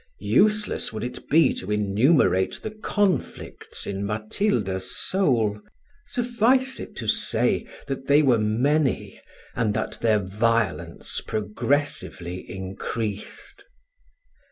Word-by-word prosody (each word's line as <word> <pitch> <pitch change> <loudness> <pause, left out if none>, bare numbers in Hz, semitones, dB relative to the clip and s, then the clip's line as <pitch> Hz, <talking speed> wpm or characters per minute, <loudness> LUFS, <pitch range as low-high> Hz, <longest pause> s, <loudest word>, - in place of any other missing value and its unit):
Useless 210 - +2
would 110 - -5
it 125 - -7
be 155 -2 +5
to 95 - -7
enumerate 105 - +2
the 220 - -4
conflicts 205 -2 -2
in 100 0 -3
Matilda's 105 - -1
soul: 115 - +2 0.5
suffice 245 +2 +1
it - - -8
to - - -5
say, - - +1 0.2
that 135 -1 -5
they 145 +2 +5
were 125 -5 +4
many, 130 +7 0 0.3
and 110 -4 0
that 110 - -3
their 110 -2 +3
violence 105 +2 -1
progressively 105 -5 -2
increased. 105 - -5
115 Hz, 105 wpm, -24 LUFS, 105-165 Hz, 0.5 s, be